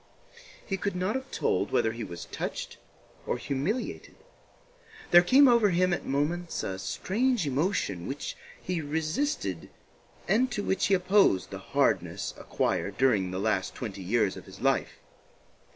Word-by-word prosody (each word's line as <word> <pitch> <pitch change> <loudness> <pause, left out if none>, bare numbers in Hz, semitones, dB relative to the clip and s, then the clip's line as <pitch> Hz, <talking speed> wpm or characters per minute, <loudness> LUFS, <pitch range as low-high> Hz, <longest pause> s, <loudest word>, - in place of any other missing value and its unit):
He 195 - -2
could 200 0 -2
not 185 +4 0
have 265 0 -4
told 100 +2 0
whether 110 - +2
he 115 0 -6
was 85 -4 -7
touched - - -5 0.5
or - - 0
humiliated. 150 - -3 1.0
There 175 - +9
came 265 +10 +6
over 235 -4 +5
him 180 0 +2
at - - -3
moments 165 +5 -1
a 95 0 -4
strange 235 - 0
emotion 140 - -1
which 135 +2 -4 0.2
he 180 -2 -3
resisted 155 - -2 0.6
and 235 +7 +3
to 205 -4 -2
which 190 - +1
he 195 - +4
opposed 185 - +3
the - - -6
hardness - - 0
acquired 100 0 -2
during 110 -8 +3
the 95 - -4
last 100 -2 0
twenty 100 -5 -6
years 105 +1 +1
of - - -10
his - - -12
life. - - 0
160 Hz, 150 wpm, -28 LUFS, -, 1.0 s, There